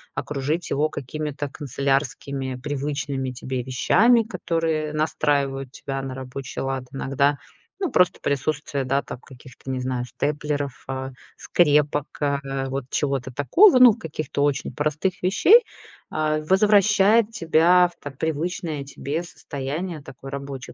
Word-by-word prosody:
окружить 150 Hz, +4 st, -2 dB
его 150 Hz, +2 st, +1 dB
какими-то 145 Hz, +1 st, -5 dB
канцелярскими, 135 Hz, -1 st, -2 dB
привычными 140 Hz, -1 st, -3 dB
тебе 125 Hz, 0 st, -4 dB
вещами, 215 Hz, -, +4 dB
которые 165 Hz, -6 st, -2 dB
настраивают 140 Hz, -3 st, 0 dB
тебя 135 Hz, 0 st, -5 dB
на 135 Hz, -1 st, -5 dB
рабочий 130 Hz, 0 st, -6 dB
лад. 135 Hz, -1 st, -3 dB
Иногда, 140 Hz, +1 st, +1 dB, 0.4 s
ну, 375 Hz, -4 st, -1 dB
просто 180 Hz, -1 st, +3 dB
присутствие, 140 Hz, 0 st, -1 dB
да, 135 Hz, +2 st, +1 dB
там, -, -, -8 dB
каких-то, 130 Hz, 0 st, -11 dB
не 130 Hz, -, -2 dB
знаю, 125 Hz, -1 st, -2 dB
степлеров, 145 Hz, 0 st, -3 dB
а, 130 Hz, 0 st, -4 dB, 0.3 s
скрепок, 150 Hz, -3 st, +2 dB, 0.2 s
а, 140 Hz, -1 st, +1 dB, 0.3 s
вот 135 Hz, 0 st, -3 dB
чего-то 135 Hz, -3 st, -1 dB
такого, 260 Hz, -, +5 dB
ну, 250 Hz, -3 st, +9 dB
каких-то 155 Hz, -2 st, -3 dB
очень 145 Hz, -1 st, 0 dB
простых 155 Hz, +5 st, -1 dB
вещей, 370 Hz, -, +6 dB, 0.5 s
а, 155 Hz, 0 st, 0 dB
возвращает 205 Hz, +4 st, +4 dB
тебя 175 Hz, -2 st, +4 dB
в 170 Hz, -, -27 dB
так 140 Hz, -2 st, -8 dB
привычное 160 Hz, -1 st, -2 dB
тебе 140 Hz, +3 st, -4 dB
состояние 155 Hz, +1 st, -5 dB
такой 135 Hz, 0 st, -10 dB
рабочей 140 Hz, -2 st, -7 dB
145 Hz, 125 wpm, -23 LUFS, 135-165 Hz, 0.5 s, ну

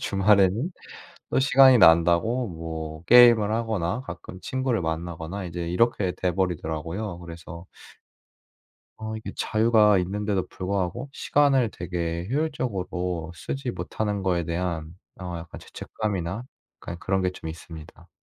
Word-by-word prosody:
주말에는 100 Hz, -, +3 dB, 0.6 s
또 -, -, +2 dB
시간이 135 Hz, -1 st, +7 dB
난다고 85 Hz, +8 st, +4 dB
뭐 80 Hz, -2 st, -6 dB
게임을 115 Hz, -1 st, +7 dB
하거나 110 Hz, -3 st, -1 dB
가끔 95 Hz, -, -9 dB
친구를 130 Hz, -5 st, -1 dB
만나거나 80 Hz, +3 st, -4 dB
이제 85 Hz, -1 st, -5 dB
이렇게 95 Hz, 0 st, +1 dB
돼 90 Hz, -1 st, +1 dB
버리더라고요. 85 Hz, +1 st, -3 dB
그래서 85 Hz, +1 st, -10 dB, 1.3 s
어 110 Hz, 0 st, -5 dB
이게 110 Hz, -, -6 dB
자유가 110 Hz, -2 st, +4 dB
있는데도 100 Hz, +1 st, -1 dB
불구하고 100 Hz, +7 st, -3 dB
시간을 135 Hz, -5 st, +2 dB
되게 85 Hz, 0 st, -4 dB
효율적으로 95 Hz, -, -2 dB
쓰지 130 Hz, +7 st, -4 dB
못하는 105 Hz, -4 st, -3 dB
거에 90 Hz, -2 st, +1 dB
대한 85 Hz, -1 st, -3 dB, 0.3 s
어 90 Hz, -2 st, -5 dB
약간 85 Hz, -1 st, -9 dB
죄책감이나 100 Hz, -1 st, -4 dB, 0.4 s
약간 85 Hz, 0 st, -7 dB
그런 95 Hz, +1 st, 0 dB
게 90 Hz, -, 0 dB
좀 80 Hz, -3 st, -8 dB
있습니다. 80 Hz, -1 st, -11 dB
95 Hz, 305 characters per minute, -25 LUFS, 85-110 Hz, 1.3 s, 시간이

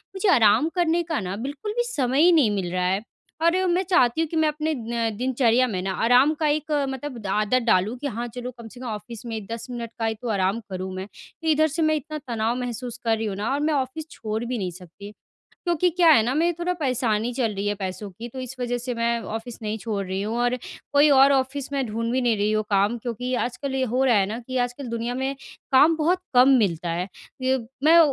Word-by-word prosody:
मुझे 385 Hz, +1 st, +1 dB
आराम 225 Hz, +7 st, +5 dB
करने 345 Hz, -1 st, +2 dB
का 320 Hz, -2 st, -2 dB
ना 185 Hz, 0 st, -4 dB
बिल्कुल 280 Hz, -, -5 dB
भी 480 Hz, -, +3 dB
समय 270 Hz, -, +1 dB
ही 355 Hz, -, +7 dB
नहीं 280 Hz, -11 st, +4 dB
मिल 180 Hz, -3 st, -2 dB
रहा 180 Hz, 0 st, 0 dB
है। 190 Hz, +3 st, +1 dB, 0.4 s
और 370 Hz, +2 st, +3 dB
मैं 355 Hz, +2 st, +2 dB
चाहती 325 Hz, -6 st, +3 dB
हूँ 325 Hz, -, 0 dB
कि 330 Hz, -, -5 dB
मैं 315 Hz, -1 st, +3 dB
अपने 305 Hz, +1 st, -1 dB
न 230 Hz, 0 st, -2 dB
दिनचर्या 255 Hz, -1 st, +2 dB
में 185 Hz, -5 st, -3 dB
ना 190 Hz, 0 st, -2 dB
आराम 250 Hz, +6 st, +5 dB
का 310 Hz, -, +2 dB
एक 305 Hz, +1 st, -1 dB, 0.2 s
मतलब 265 Hz, -1 st, -5 dB
ड 200 Hz, -, -6 dB
आदत 210 Hz, +5 st, +1 dB
डालूँ, 215 Hz, +3 st, +2 dB
कि 285 Hz, -, -4 dB
हाँ 240 Hz, 0 st, -4 dB
चलो 250 Hz, 0 st, -5 dB
कम 230 Hz, -1 st, -9 dB
से 245 Hz, +2 st, -13 dB
कम 255 Hz, -, -7 dB
ऑफ़िस 225 Hz, +2 st, -7 dB
में 220 Hz, -3 st, -5 dB
10 230 Hz, +2 st, -5 dB
मिनट 235 Hz, -1 st, -5 dB
का 225 Hz, -, 0 dB
ही 220 Hz, 0 st, 0 dB
तो 240 Hz, -, -4 dB
आराम 195 Hz, +1 st, +1 dB
करूँ 185 Hz, 0 st, -5 dB
मैं। 190 Hz, +1 st, -4 dB, 0.4 s
फिर 320 Hz, -, -1 dB
इधर 310 Hz, +1 st, +4 dB
से 320 Hz, +3 st, -3 dB
मैं 310 Hz, 0 st, +3 dB
इतना 305 Hz, +1 st, -5 dB
तनाव 230 Hz, 0 st, 0 dB
महसूस 245 Hz, 0 st, -5 dB
कर 225 Hz, -1 st, +2 dB
रही 225 Hz, -, -3 dB
हूँ 195 Hz, -, -3 dB
ना 210 Hz, +6 st, -2 dB
और 285 Hz, -, 0 dB
मैं 305 Hz, +1 st, +1 dB
ऑफ़िस 280 Hz, +3 st, -2 dB
छोड़ 220 Hz, +1 st, -4 dB
भी 245 Hz, 0 st, -2 dB
नहीं 185 Hz, -3 st, -3 dB
सकती, 185 Hz, +3 st, -11 dB, 0.5 s
क्योंकि 345 Hz, 0 st, +2 dB
क्या 345 Hz, 0 st, +4 dB
है 230 Hz, -8 st, +7 dB
ना 250 Hz, +3 st, 0 dB
मेरी 340 Hz, +3 st, +2 dB
थोड़ा 355 Hz, +1 st, 0 dB
परेशानी 245 Hz, -4 st, 0 dB
चल 230 Hz, -5 st, 0 dB
रही 200 Hz, +1 st, -3 dB
है 205 Hz, -, +1 dB
पैसों 195 Hz, +1 st, -5 dB
की, 225 Hz, +6 st, -8 dB
तो 260 Hz, +2 st, -8 dB
इस 255 Hz, 0 st, -6 dB
वज़ह 245 Hz, 0 st, -1 dB
से 245 Hz, 0 st, -4 dB
मैं 235 Hz, 0 st, 0 dB
ऑफ़िस 225 Hz, +2 st, -6 dB
नहीं 215 Hz, +1 st, -3 dB
छोड़ 205 Hz, -3 st, -3 dB
रही 190 Hz, +1 st, -3 dB
हूँ। 220 Hz, +3 st, -2 dB
और 245 Hz, +1 st, +2 dB, 0.4 s
कोई 290 Hz, +1 st, +6 dB
और 275 Hz, 0 st, +6 dB
ऑफ़िस 270 Hz, +1 st, -1 dB
में 275 Hz, -2 st, 0 dB
ढूँढ़ 230 Hz, +1 st, -2 dB
भी 260 Hz, -, +1 dB
नहीं 240 Hz, -3 st, +2 dB
रही 205 Hz, +1 st, +1 dB
हूँ 215 Hz, 0 st, +1 dB
काम 200 Hz, +4 st, +2 dB
क्योंकि 250 Hz, +2 st, -3 dB
आजकल 265 Hz, +3 st, -4 dB
ये 260 Hz, -1 st, +1 dB
हो 260 Hz, -, +3 dB
रहा 240 Hz, -4 st, +4 dB
है 195 Hz, -1 st, +3 dB
ना 220 Hz, +3 st, -4 dB
कि 260 Hz, -, -4 dB
आजकल 245 Hz, +2 st, -2 dB
दुनिया 235 Hz, +1 st, -3 dB
में 265 Hz, +2 st, -2 dB, 0.4 s
काम 310 Hz, +5 st, +6 dB
बहुत 340 Hz, +4 st, +2 dB, 0.2 s
कम 250 Hz, +2 st, +7 dB
मिलता 175 Hz, -5 st, 0 dB
है। 175 Hz, +3 st, -2 dB, 0.3 s
ये 260 Hz, 0 st, +2 dB, 0.3 s
मैं 330 Hz, +2 st, +7 dB
245 Hz, 245 wpm, -24 LUFS, 215-285 Hz, 0.5 s, ही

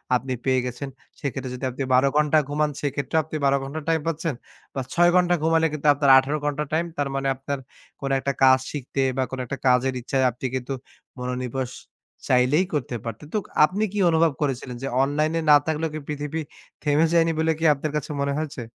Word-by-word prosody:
আপনি 130 Hz, +1 st, -1 dB
পেয়ে 130 Hz, -1 st, +3 dB
গেছেন। 125 Hz, +3 st, -5 dB, 0.3 s
সেক্ষেত্রে 130 Hz, -1 st, -4 dB
যদি 130 Hz, +1 st, -5 dB
আপনি 130 Hz, +3 st, -4 dB
১২ 130 Hz, +2 st, +5 dB
ঘন্টা 150 Hz, +1 st, +4 dB
ঘুমান 150 Hz, +1 st, +1 dB
সেক্ষেত্রেও 145 Hz, +2 st, 0 dB
আপনি 155 Hz, -, -8 dB
১২ 140 Hz, 0 st, +4 dB
ঘন্টা 145 Hz, +4 st, -5 dB
টাইম 160 Hz, -, +3 dB
পাচ্ছেন 165 Hz, -1 st, -1 dB, 0.4 s
বা, 135 Hz, -, -3 dB
৬ 175 Hz, 0 st, +5 dB
ঘন্টা 180 Hz, -1 st, +4 dB
ঘুমালে 160 Hz, 0 st, +3 dB
কিন্তু 150 Hz, 0 st, -2 dB
আপনার 140 Hz, -1 st, +1 dB
১৮ 135 Hz, +3 st, +5 dB
ঘন্টা 145 Hz, 0 st, -1 dB
টাইম। 165 Hz, +2 st, +2 dB
তার 145 Hz, -1 st, 0 dB
মানে 135 Hz, 0 st, -1 dB
আপনার 135 Hz, +1 st, -4 dB, 0.4 s
কোন 135 Hz, -, -2 dB
একটা 140 Hz, +1 st, -1 dB
কাজ 130 Hz, 0 st, +7 dB
শিখতে 135 Hz, -1 st, -3 dB, 0.2 s
বা, 130 Hz, -, +2 dB
কোনো 130 Hz, -1 st, -4 dB
একটা 135 Hz, +3 st, -5 dB
কাজের 125 Hz, +1 st, +3 dB
ইচ্ছায় 130 Hz, +1 st, 0 dB
আপনি 125 Hz, +2 st, -8 dB
কিন্তু 130 Hz, +1 st, -3 dB, 0.5 s
মনোনিনেশ 125 Hz, 0 st, -3 dB, 0.6 s
চাইলেই 130 Hz, +7 st, +4 dB
করতে 125 Hz, -4 st, -2 dB
পারতেন। 115 Hz, +5 st, -6 dB
তো -, -, +2 dB, 0.3 s
আপনি 195 Hz, +7 st, -2 dB
কি 205 Hz, -, -1 dB
অনুভব 165 Hz, 0 st, +3 dB
করেছিলেন 130 Hz, -3 st, -2 dB
যে, -, -, -1 dB, 0.2 s
অনলাইনে 155 Hz, +4 st, 0 dB
না 145 Hz, -, +10 dB
থাকলেও 160 Hz, 0 st, -1 dB, 0.2 s
পৃথিবী 150 Hz, +2 st, -3 dB, 0.4 s
থেমে 150 Hz, +1 st, +3 dB
যায়নি 165 Hz, -1 st, +4 dB
বলে 160 Hz, 0 st, +2 dB
কি 165 Hz, -, -1 dB
আপনার 145 Hz, +1 st, -4 dB
কাছে 150 Hz, -, -5 dB
মনে 140 Hz, 0 st, 0 dB
হয়েছে? 155 Hz, -4 st, -4 dB
140 Hz, 190 wpm, -24 LUFS, 130-155 Hz, 0.6 s, না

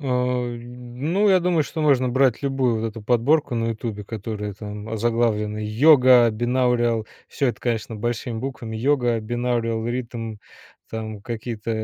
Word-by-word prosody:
А, -, -, -10 dB, 0.5 s
ну, 125 Hz, -, -2 dB
я 185 Hz, -1 st, +5 dB
думаю, 170 Hz, -4 st, +2 dB
что 160 Hz, -, -5 dB
можно 130 Hz, -4 st, +3 dB
брать 130 Hz, 0 st, +2 dB
любую 135 Hz, -4 st, +1 dB
вот 115 Hz, -, -1 dB
эту 110 Hz, 0 st, -9 dB
подборку 125 Hz, +5 st, +2 dB
на 115 Hz, 0 st, 0 dB
"Ютубе", 110 Hz, -2 st, -5 dB
которая 105 Hz, -1 st, -5 dB
там 105 Hz, +1 st, -8 dB
озаглавлена 110 Hz, -1 st, 0 dB
"Yoga 125 Hz, +2 st, +6 dB
binaural". 120 Hz, -1 st, +1 dB, 0.2 s
Всё 140 Hz, -, 0 dB
это, 120 Hz, -, -4 dB
конечно, 115 Hz, -2 st, -2 dB
большими 120 Hz, +1 st, -3 dB
буквами 120 Hz, -3 st, -5 dB
"Yoga 120 Hz, -1 st, +1 dB
binaural 115 Hz, -1 st, -1 dB
rhythm", 115 Hz, -3 st, -4 dB, 0.5 s
там 110 Hz, -2 st, -5 dB
какие-то, 115 Hz, 0 st, -5 dB
120 Hz, 140 wpm, -23 LUFS, 110-130 Hz, 0.5 s, Yoga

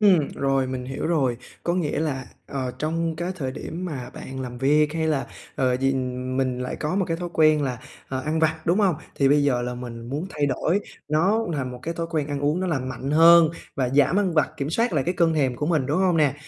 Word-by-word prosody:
Ừm, 185 Hz, -9 st, +5 dB
rồi 135 Hz, -1 st, +1 dB
mình 130 Hz, -1 st, -4 dB
hiểu 135 Hz, +4 st, -4 dB
rồi. 135 Hz, -8 st, +1 dB, 0.3 s
Có 175 Hz, -, +1 dB
nghĩa 155 Hz, -5 st, -1 dB
là, 135 Hz, -5 st, -2 dB, 0.2 s
ờ, 130 Hz, -2 st, -3 dB
trong 165 Hz, +1 st, -1 dB
cái 175 Hz, +2 st, -2 dB
thời 130 Hz, -5 st, -3 dB
điểm 175 Hz, +6 st, -6 dB
mà 130 Hz, -7 st, -5 dB
bạn 130 Hz, 0 st, -7 dB
làm 125 Hz, -1 st, -6 dB
việc, 150 Hz, +3 st, +3 dB
hay 160 Hz, -1 st, 0 dB
là, 150 Hz, -3 st, 0 dB, 0.3 s
ờ, 125 Hz, -2 st, +2 dB
gì 135 Hz, +1 st, +1 dB, 0.2 s
mình 130 Hz, 0 st, -1 dB
lại 125 Hz, 0 st, -4 dB
có 155 Hz, +4 st, -2 dB
một 195 Hz, -1 st, +2 dB
cái 165 Hz, -, 0 dB
thói 175 Hz, 0 st, -4 dB
quen 155 Hz, -2 st, +4 dB
là, 125 Hz, -4 st, -2 dB, 0.3 s
ờ, 130 Hz, -1 st, -2 dB
ăn 155 Hz, +4 st, -1 dB
vặt, 160 Hz, 0 st, +2 dB
đúng 175 Hz, +5 st, +3 dB
hông? 190 Hz, -6 st, +3 dB, 0.2 s
Thì 135 Hz, -1 st, +3 dB
bây 145 Hz, 0 st, +4 dB
giờ 125 Hz, -4 st, +2 dB
là 125 Hz, 0 st, -3 dB
mình 120 Hz, -1 st, -7 dB
muốn 150 Hz, +7 st, -3 dB
thay 145 Hz, -1 st, 0 dB
đổi 170 Hz, +8 st, +1 dB, 0.3 s
nó 195 Hz, +9 st, +2 dB
thành 130 Hz, -3 st, -2 dB
một 125 Hz, -, -8 dB
cái 165 Hz, +1 st, -3 dB
thói 165 Hz, 0 st, -3 dB
quen 155 Hz, -4 st, 0 dB
ăn 145 Hz, -1 st, -3 dB
uống 150 Hz, +5 st, +1 dB
nó 185 Hz, -, -1 dB
lành 135 Hz, -6 st, -1 dB
mạnh 135 Hz, +1 st, -4 dB
hơn 165 Hz, +1 st, +7 dB, 0.3 s
và 130 Hz, -2 st, +1 dB
giảm 145 Hz, +7 st, +3 dB
ăn 190 Hz, -4 st, +1 dB
vặt, 155 Hz, -, +3 dB
kiểm 140 Hz, +2 st, -3 dB
soát 230 Hz, +5 st, +1 dB
lại 140 Hz, -4 st, +1 dB
cái 180 Hz, -, 0 dB
cơn 165 Hz, -2 st, +3 dB
thèm 130 Hz, -5 st, +1 dB
của 150 Hz, -, -2 dB
mình, 155 Hz, -6 st, +1 dB
đúng 150 Hz, +5 st, +1 dB
hông 185 Hz, -3 st, +3 dB
nè? 145 Hz, -3 st, +3 dB
150 Hz, 250 wpm, -24 LUFS, 130-165 Hz, 0.3 s, hơn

